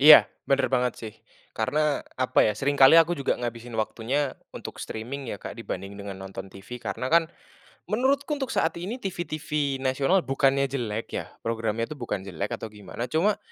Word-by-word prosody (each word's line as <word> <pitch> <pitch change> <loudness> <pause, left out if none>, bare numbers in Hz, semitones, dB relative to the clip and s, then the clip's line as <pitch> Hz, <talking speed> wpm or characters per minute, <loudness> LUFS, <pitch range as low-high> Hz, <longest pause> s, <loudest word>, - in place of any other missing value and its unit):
Iya, 150 +2 +10 0.2
bener 135 -1 +3
banget 125 -1 +3
sih 110 -2 -7 0.4
karena 150 +1 +1 0.2
apa 130 0 +3
ya, 105 - -1
seringkali 140 +1 +6
aku 165 +1 +6
juga 140 -5 0
ngabisin 120 -1 -5
waktunya 125 +6 0 0.2
untuk - - -8
streaming 125 +4 -5
ya - - -3
Kak - - -7
dibanding 95 +1 -5
dengan 100 -1 -6
nonton 95 0 -7
TV, 100 +6 -9
karena 115 +6 -3
kan 165 -1 +5 0.6
menurutku 275 +6 +1
untuk 265 - -1
saat 160 0 +1
ini 205 +8 -3
TV-TV 155 - -2
nasional, 135 +7 +2
bukannya 135 +1 +3
jelek 120 -5 -3
ya, - - -2 0.2
programnya 115 0 0
tuh 155 - -7
bukan 120 -8 -4
jelek 100 +2 -3
atau 110 -1 -7
gimana 105 +3 -5
cuma 165 - +2
130 Hz, 170 wpm, -26 LUFS, 110-150 Hz, 0.6 s, Iya